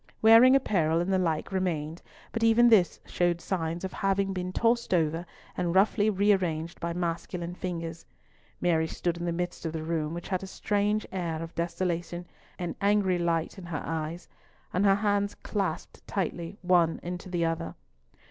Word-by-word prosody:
Wearing 230 +4 +8
apparel 170 - +2
and 180 +3 0
the 190 - +3
like 165 -1 -1
remained, 170 -4 -2 0.3
but 230 - -3
even 230 +1 +6
this 200 -6 +4
showed 175 -1 0
signs 170 -1 -3
of 190 - -4
having 195 0 0
been 180 -1 -3
tossed 230 0 +2
over 165 +1 0 0.3
and 175 0 -1
roughly 205 +2 +4
rearranged 185 -5 +1
by 170 - -2
masculine 170 0 -3
fingers. 165 -2 -5 0.6
Mary 160 -2 +2
stood 170 +1 -2
in 175 - -4
the 170 - 0
midst 175 +1 -3
of 165 -1 -3
the 160 -1 -3
room, 160 -1 -2
which 175 - -7
had 185 -2 -1
a 195 - -6
strange 205 +2 0
air 170 -4 -2
of 165 - -8
desolation, 175 0 -2 0.3
an 175 -2 -4
angry 200 -3 +3
light 170 +2 -1
in 180 - -9
her 165 -3 -4
eyes, 165 +1 -4 0.5
and 185 +3 +2
her 195 -1 +6
hands 205 0 0
clasped 195 -6 -4
tightly 175 -1 -3
one 175 -2 +3
into 180 +1 -5
the 175 -2 0
other. 165 0 -2
175 Hz, 170 wpm, -28 LUFS, 165-195 Hz, 0.6 s, Wearing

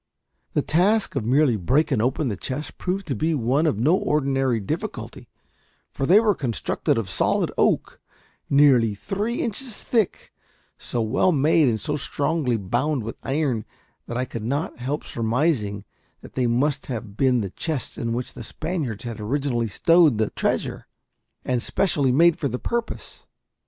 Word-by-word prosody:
The - - +1
task 195 +6 +2
of 135 - 0
merely 130 +1 +3
breaking 130 - +1
open 130 +5 0
the 105 - -1
chests 135 +9 -5
proved 190 +1 -3
to - - -2
be 160 +1 0
one 135 +5 +1
of 140 - +1
no 145 +11 +3
ordinary 135 -7 +1
difficulty; 100 - -5 0.6
for 135 - -2
they 195 +5 +7
were 220 -2 +3
constructed 125 - -1
of 115 -4 -1
solid 95 - +1
oak, - - +1 0.5
nearly 130 -7 +5
three 205 - -2
inches 230 0 -4
thick, 225 -6 -1 0.5
so 120 - -1
well 125 +11 +2
made, 155 0 +3
and 110 -3 +1
so 150 +3 -2
strongly 140 -3 0
bound 120 +7 -1
with 115 - -6
iron, 135 -5 -1 0.4
that 120 - -4
I 130 - 0
could 115 -3 -6
not 140 +6 -2
help 135 +5 -3
surmising 115 -4 -1 0.4
that - - -13
they 125 -2 +1
must 130 +5 0
have 115 -5 -5
been 125 -1 +2
the 100 -3 -4
chests 155 0 -3
in 115 -1 -2
which 120 +2 -3
the - - -8
Spaniards 150 - -4
had 115 -3 -6
originally 120 +1 -1
stowed 160 - +4
the 110 -1 0
treasure, - - -2 0.6
and 125 -2 0
specially 145 -4 +1
made 165 +5 +4
for 140 - 0
the 125 - -3
purpose. 235 - -4
135 Hz, 160 wpm, -24 LUFS, 115-155 Hz, 0.6 s, they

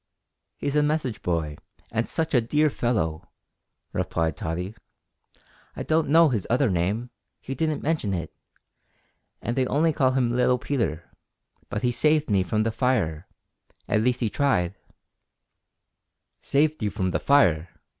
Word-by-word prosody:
"He's 145 0 -2
a 150 - +4
message 150 -6 -1
boy, 80 -4 -2 0.3
and 115 +1 -1
such 160 -1 -2
a 125 - +5
dear 150 +6 +2
fellow," 95 -13 -1 0.6
replied 80 -2 -1
Tottie. 90 +5 -4 1.0
"I - - -4
don't 160 -2 +1
know 165 +1 +6
his 110 -8 -2
other 125 -1 +2
name, 100 +8 -1 0.3
he 135 - -6
didn't 155 +2 -1
mention 150 -10 0
it, 85 -4 -4 1.1
and 120 - -2
they 130 -1 +1
only 155 +4 +2
call 130 -3 +2
him 125 -3 +1
little 125 +1 +3
Peter, 105 - -2 0.6
but 105 - -3
he 125 - +2
saved 150 +2 +2
me 100 -2 +4
from 110 +4 0
the 115 - 0
fire; 110 - 0 0.6
at 110 - +2
least 125 +2 +1
he 115 - +1
tried 100 -12 +1 0.9
" - - -56
"Saved 150 +1 +1
you 105 - +1
from 95 -1 -1
the - - 0
fire!" 90 - +3
120 Hz, 150 wpm, -25 LUFS, 95-145 Hz, 1.1 s, know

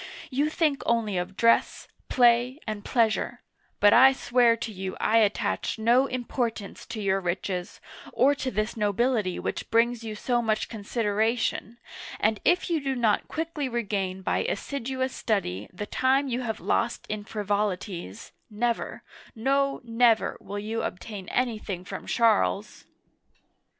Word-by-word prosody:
You 285 +4 +1
think 310 -3 +1
only 225 -4 +1
of 185 +2 -6
dress, 230 0 +2 0.2
play, 245 +2 +3
and 215 -2 -4
pleasure; 225 -3 0 0.4
but 205 0 +6
I 265 +3 +8
swear 240 -3 +3
to 225 0 -5
you 190 -1 -5
I 225 - +3
attach 215 +1 0
no 240 +5 +4
importance 240 -4 -4
to 225 -1 -6
your 195 -2 +1
riches, 180 0 -3 0.3
or 270 +4 +4
to 265 -2 -3
this 215 -1 -2
nobility 210 -2 +1
which - - -4
brings 235 +1 +2
you 220 -1 -5
so 240 +3 0
much 215 -2 -1
consideration, 220 +1 -1 0.4
and 215 -1 +1
if 355 +1 +3
you 335 -4 0
do 270 -1 -1
not 230 -4 +1
quickly 315 -4 -3
regain 195 -5 -2
by - - 0
assiduous 260 -1 -2
study 105 - -2
the 205 +3 -5
time 265 +5 +1
you 250 -1 -2
have 225 -3 -3
lost 235 +1 -1
in 210 0 -4
frivolities, 200 - -3 0.2
never, 230 +2 -2 0.3
no, 275 +4 +1
never, 230 -1 +3
will 205 - -6
you 215 +2 -3
obtain 190 +1 -6
anything 215 -7 -2
from - - -7
Charles 220 -3 +1
225 Hz, 140 wpm, -26 LUFS, 205-250 Hz, 0.4 s, I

